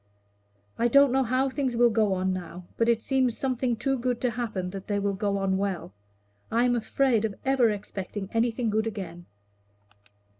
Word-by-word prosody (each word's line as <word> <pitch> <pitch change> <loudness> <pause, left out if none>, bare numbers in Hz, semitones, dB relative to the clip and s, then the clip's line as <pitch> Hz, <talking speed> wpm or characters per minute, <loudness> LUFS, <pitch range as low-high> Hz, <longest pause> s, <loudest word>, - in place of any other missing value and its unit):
"I 235 - +3
don't 280 +2 +5
know 265 +1 +3
how 255 +2 +1
things 260 -3 -2
will 240 0 +5
go 215 -3 +2
on 185 0 0
now, 180 -1 -7
but 230 0 +2
it 230 -1 +2
seems 260 -3 +1
something 255 -2 0
too 270 +3 -1
good 245 0 -1
to 250 - +1
happen 215 -6 -3
that 195 0 -8
they 205 - 0
will 200 0 0
go 200 +1 -1
on 190 -1 0
well. 195 - -3 0.6
I 235 +2 +2
am 245 0 +3
afraid 240 0 +1
of 215 -3 -2
ever 265 -3 +4
expecting 200 -1 -5
anything 230 0 +1
good 220 +1 0
again." 175 -5 -6
225 Hz, 185 wpm, -27 LUFS, 200-250 Hz, 0.6 s, don't